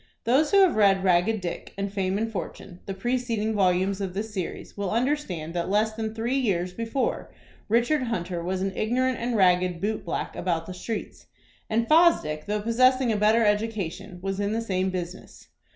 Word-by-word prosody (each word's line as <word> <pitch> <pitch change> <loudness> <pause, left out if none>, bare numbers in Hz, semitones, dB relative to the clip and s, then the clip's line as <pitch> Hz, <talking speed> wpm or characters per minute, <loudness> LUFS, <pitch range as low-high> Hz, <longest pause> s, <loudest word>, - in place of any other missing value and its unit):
Those 270 +6 +3
who 400 -1 +5
have 370 - +4
read 195 -2 +4
"Ragged 190 +4 +2
Dick" 175 -1 -6
and 200 0 -3
"Fame 190 -1 0
and 225 +1 -2
Fortune," 180 -2 -7
the 195 - -3
preceding 230 0 -1
volumes 190 0 +1
of 190 -2 -4
this 210 +2 -4
series, 185 -4 -5
will 200 -2 -2
understand 225 - -1
that 175 0 -2
less 215 +2 +2
than 220 0 -4
three 240 +4 0
years 180 -7 0
before 230 +5 -2 0.4
Richard 240 +7 +2
Hunter 180 -6 -3
was 185 +2 -2
an 195 -1 -2
ignorant 255 +3 0
and 235 +1 -1
ragged 180 -2 +3
boot 210 +3 -2
black 170 - -4
about 170 -2 -1
the 185 - -7
streets, 215 +4 -6 0.4
and 230 +1 +1
Fosdick, 305 - +3
though 210 0 -1
possessing 255 +2 +3
a - - +1
better 215 +2 +3
education, 210 -4 -1
was 195 0 -2
in 205 +1 0
the 225 - -1
same 190 -4 -1
business. 180 -1 -7
210 Hz, 185 wpm, -26 LUFS, 185-230 Hz, 0.4 s, who